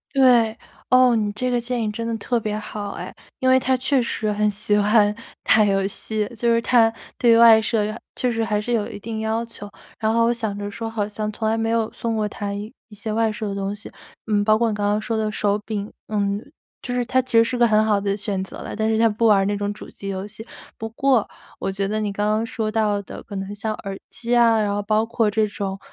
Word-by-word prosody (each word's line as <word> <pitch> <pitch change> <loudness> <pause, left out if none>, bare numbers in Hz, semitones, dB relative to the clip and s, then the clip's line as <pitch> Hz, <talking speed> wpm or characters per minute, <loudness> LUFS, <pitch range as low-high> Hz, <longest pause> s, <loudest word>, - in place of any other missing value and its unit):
对， 240 -4 +5 0.3
哦， 255 -1 +6
你 210 -2 0
这 250 +5 -2
个 245 - +1
建 240 0 -2
议 215 - 0
真 230 +2 -4
的 230 - -1
特 240 +3 -1
别 215 -1 -2
好 210 -1 -6
哎。 - - -7 0.2
因 260 - 0
为 260 - +6
他 260 0 +1
确 265 +1 +2
实 220 -2 -2
很 210 0 +1
喜 205 +1 0
欢 210 0 +4 0.3
打 220 - +5
游 195 -1 +2
戏， 215 +1 -3
就 235 +1 +2
是 230 - +2
他 230 -2 +4 0.2
对 230 -2 +5
外 225 -1 +8
设 220 -1 0 0.4
确 250 - +1
实 225 -1 0
还 210 -1 0
是 240 +3 -2
有 215 -3 0
一 - - -8
定 220 +1 -5
要 220 +1 -1
求。 205 -3 -10 0.3
然 220 0 +1
后 230 0 +3
我 235 - +3
想 220 -4 -3
着 205 0 -4
说 225 +2 -5
好 215 -2 -2
像 215 0 -4
从 220 +1 -3
来 225 - +1
没 225 0 0
有 225 -1 +1
送 230 -1 -2
过 210 - 0
他 205 -1 -5
一 205 +2 -6 0.2
些 215 +1 -5
外 225 0 +2
设 215 0 -4
的 200 - -3
东 195 0 -2
西。 210 - -8 0.4
嗯， 205 -2 +2
包 215 0 +4
括 230 0 +2
你 215 - -2
刚 205 -1 -1
刚 210 +1 +1
说 225 +1 -3
的 215 -1 0
手 205 -1 +1
柄， 210 -1 -4 0.2
嗯， 205 0 -1 0.4
就 245 - -4
是 245 -1 0
它 260 +3 +2
其 255 -2 0
实 230 - +8
是 245 +2 -2
个 240 - +5
很 215 -1 +3
好 210 -2 +3
的 200 0 -1
选 195 -2 -2
择 - - -9
了， - - -7
但 220 +1 0
是 220 0 +1
他 230 - +5
不 225 +1 +1
玩 210 -2 +6
儿 195 - +2
那 205 +1 0
种 205 0 -2
主 - - -11
机 195 - -8
游 190 +1 -4
戏。 220 +2 -10 0.3
不 225 - -5
过， 250 0 +2 0.3
我 195 - -2
觉 195 0 -2
得 215 +1 -1
你 210 -1 -1
刚 205 +1 -1
刚 215 +2 +1
说 220 -1 -2
到 215 -2 +1
的， 200 - -10
可 200 -3 -7
能 195 +2 -5
像 215 +1 -3
耳 195 0 -4
机 245 +1 -1
啊， 230 -2 +5
然 205 -1 0
后 205 - -1
包 215 +2 +1
括 225 -2 +1
这 215 0 +2
种， 195 -1 -4
215 Hz, 280 characters per minute, -22 LUFS, 205-230 Hz, 0.4 s, 外